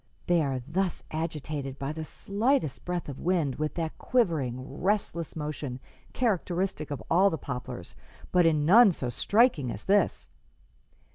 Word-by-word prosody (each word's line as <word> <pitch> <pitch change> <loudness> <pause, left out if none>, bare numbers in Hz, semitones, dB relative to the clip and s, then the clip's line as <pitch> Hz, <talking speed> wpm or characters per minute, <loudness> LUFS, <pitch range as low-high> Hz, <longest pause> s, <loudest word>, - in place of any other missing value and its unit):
They 175 -2 +3
are 135 -4 -1
thus 185 +3 -1
agitated 150 -4 -4
by 135 +1 -3
the 160 +1 -5
slightest 205 - -1
breath 180 -1 -3
of 140 -2 -7
wind 165 -7 0
with 155 0 -2
that 165 -2 -3
quivering, 140 - 0
restless 190 -4 -1
motion 150 -4 -4 0.3
characteristic 185 - -1
of 140 -7 -5
all 190 +4 +5
the 160 - -2
poplars, 125 -4 -6 0.4
but 180 -2 +5
in 155 -2 +2
none 210 +5 +8
so 125 -5 -3
striking 170 - +3
as - - -5
this. 200 +1 +1
160 Hz, 145 wpm, -28 LUFS, 140-190 Hz, 0.4 s, none